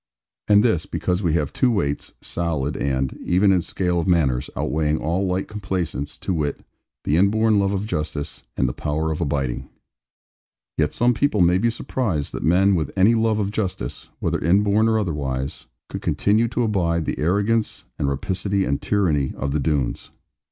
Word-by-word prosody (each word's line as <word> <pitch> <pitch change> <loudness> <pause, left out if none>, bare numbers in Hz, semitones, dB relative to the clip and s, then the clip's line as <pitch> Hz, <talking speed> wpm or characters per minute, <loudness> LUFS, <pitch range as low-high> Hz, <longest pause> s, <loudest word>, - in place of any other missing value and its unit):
And 105 0 +6
this, 110 -10 +1
because 90 +1 -1
we 85 -5 +1
have 75 -4 0
two 130 - +2
weights, 75 -11 -1
solid 80 -4 -2
and 65 -1 -1
(even 95 +3 +3
in 90 -2 +3
scale 90 0 -1
of 85 - -2
manners) 70 -7 +2
outweighing 75 0 0
all 90 +6 -1
light 90 +1 -1
complaisance; 90 - -3
to 95 - -2
wit, 75 -4 -2 0.4
the 75 - +1
inborn 105 +3 +3
love 100 0 +1
of 100 0 -1
justice, 75 -7 -4 0.2
and 65 - +2
the 60 - -2
power 80 +2 -2
of 80 - -3
abiding. 70 -4 -2 1.1
Yet 75 -1 0
some 120 +1 +3
people 110 -4 +1
may 90 +1 +4
be 115 +3 +2
surprised 110 - -2
that - - -4
men 95 +4 +4
with 80 -6 0
any 100 +5 +5
love 110 -1 +2
of 100 -1 -1
justice, 100 -4 -4
whether - - -1
inborn 100 +6 +3
or 110 - +2
otherwise, 70 -9 -3 0.2
could - - -6
continue 110 +3 +2
to 120 +1 -1
abide 85 -7 0
the - - -3
arrogance, 105 +7 0
and 70 - +1
rapacity, 95 +5 -1
and 70 +1 -1
tyranny 80 -10 +1
of 70 0 -2
the 75 - 0
Doones. 70 -4 -1
90 Hz, 175 wpm, -22 LUFS, 75-105 Hz, 1.1 s, And